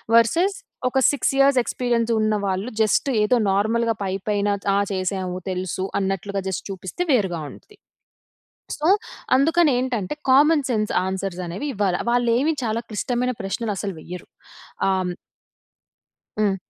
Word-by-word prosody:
Versus 335 - +3 0.3
ఒక 265 - +1
6 285 - 0
years 275 -1 +5
experience 235 -2 0
ఉన్న 215 0 +2
వాళ్ళు 190 +4 -1
జస్ట్, 220 +6 +2
ఏదో 230 +4 +3 0.2
నార్మల్‌గా 225 +3 +1
పైపైన, 200 +2 -1 0.3
"ఆ! - - +3 0.2
చేశాము. 185 -1 -2
తెలుసు" 185 +1 -3
అన్నట్లుగా 195 +1 -2
జస్ట్ 190 - -3
చూపిస్తే 190 - -4
వేరుగా 190 -9 +1
ఉంటుంది. 420 - -17 1.0
సో, 305 - -1 0.5
అందుకని 325 +3 +4
ఏంటంటే, 250 -3 -2 0.2
కామన్ 290 +2 +5
సెన్స్ 215 -2 0 0.2
ఆన్సర్‌స్ 190 -1 -3
అనేవి 180 +13 -5
ఇవ్వాలి. 195 -3 +1
వాళ్లేమి 245 +5 +2
చాలా 225 +1 -1
క్లిష్టమైన 245 +4 -1
ప్రశ్నలు 210 +3 -2
అసలు 200 -2 -3
వెయ్యరు. 180 +3 -9 0.6
ఆహ్, 190 -1 +2
హ్మ్ 180 - -2 1.3
హ్మ్. 200 -2 +2
215 Hz, 130 wpm, -23 LUFS, 190-250 Hz, 1.3 s, years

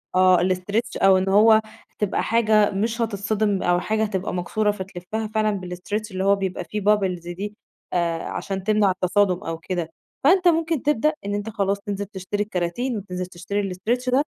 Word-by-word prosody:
آه 185 -1 +6
الstretch 190 +6 0
أو 190 -1 +7
إن 190 +1 0
هو 220 +2 +6 0.4
تبقى 210 -2 0
حاجة 215 -2 +3
مش 225 +4 -1
هتتصدِم 210 -1 0
أو 175 0 +3
حاجة 220 +4 0
هتبقى 195 -4 -2
مكسورة 210 +4 0
فتلفَّها 195 +2 -5
فعلًا 215 -2 0
بالstretch 205 +4 -4
اللي 185 0 -2
هو 200 +1 +4
بيبقى 190 -2 -3
فيه 210 +4 -4
bubbles 185 -4 +1
دي 205 +3 -5 0.4
آآ 170 -2 0
عشان 195 -1 -4
تمنَع 210 -1 +3
التصادُم 185 +1 +1
أو 165 0 -4
كده، 170 0 -4 0.3
فأنت 360 +5 +5
ممكن 325 -3 +2
تبدأ 300 +1 +2
إن 205 - -2
أنت 205 +2 -3
خلاص 200 -2 -1
تنزِل 200 0 -4
تشتري 200 +1 -3
الكَراتين 210 +5 -2
وتنزِل 180 -2 -5
تشتري 185 +2 -3
الstretch 240 +7 -1
ده 270 +3 +4
200 Hz, 170 wpm, -23 LUFS, 185-215 Hz, 0.4 s, أو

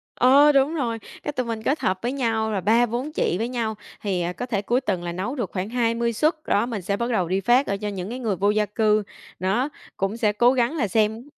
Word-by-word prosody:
Ờ, 280 +4 +6
đúng 280 +3 +2
rồi. 235 -7 -2 0.2
Cái - - -2
tụi 255 -3 -2
mình 225 -1 -4
kết 280 +7 +1
hợp 185 0 0
với 240 +2 -1
nhau 225 -5 0
là 195 -3 -1
3-4 240 - +1
chị 180 - 0
với 225 - -1
nhau, 230 -3 -2 0.3
thì, 190 -4 -1
à, 175 +1 -2
có 245 - -5
thể 215 -5 -1
cuối 240 +5 +1
tuần 190 -8 -2
là 175 - -3
nấu 195 +10 -3
được 235 -8 -3
khoảng 190 +1 -3
20 235 -1 0
suất. 310 +8 +2
Đó, 205 +3 +2
mình 230 -5 -4
sẽ 200 +3 -2
bắt 235 +2 -2
đầu 185 -6 +1
đi 190 +3 0
phát, 245 +6 +3
ờ, 200 - -1
cho 210 +1 -4
những 195 -1 -4
cái 245 +3 -5
người 220 -6 -1
vô 200 +3 +1
gia 210 0 +2
cư, 215 +1 +2 0.4
đó, 205 +10 0 0.3
cũng 195 +3 -1
sẽ 215 -3 +1
cố 240 +4 +4
gắng 250 +3 +1
là 225 -8 +1
xem 220 +6 0
225 Hz, 260 wpm, -24 LUFS, 200-245 Hz, 0.4 s, Ờ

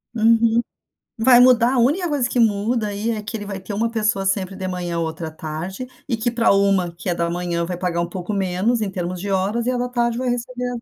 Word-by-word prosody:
Uhum. 230 +1 +4 0.6
Vai 245 +1 +7
mudar. 250 0 +5
A - - +1
única 305 +9 +2
coisa 280 -5 0
que - - -2
muda 220 0 +2
aí 205 +3 -2
é 215 -2 -3
que 225 +2 -5
ele 205 - -6
vai 195 -1 -5
ter 190 +2 -8
uma 230 +3 0
pessoa 215 -3 0
sempre 195 -1 0
de 190 -1 -4
manhã, 175 -2 -3
outra 160 0 -4
tarde, 160 +9 -6 0.2
e 235 - 0
que 230 +2 -1
para 230 -2 +3
uma 195 -3 +2
que 170 +2 -7
é 175 - +1
da 170 0 -1
manhã, 170 0 -2
vai 180 +1 -4
pagar 175 -1 -1
um 170 - -1
pouco 180 +3 -5
menos 195 +4 0
em 210 -2 -1
termos 180 -1 -4
de 200 - -4
horas, 200 +5 0
e 255 - +2
a 255 - -1
da 245 0 -1
tarde 235 -1 0
vai 255 0 -1
receber 245 +1 -3
205 Hz, 245 wpm, -21 LUFS, 180-235 Hz, 0.6 s, Vai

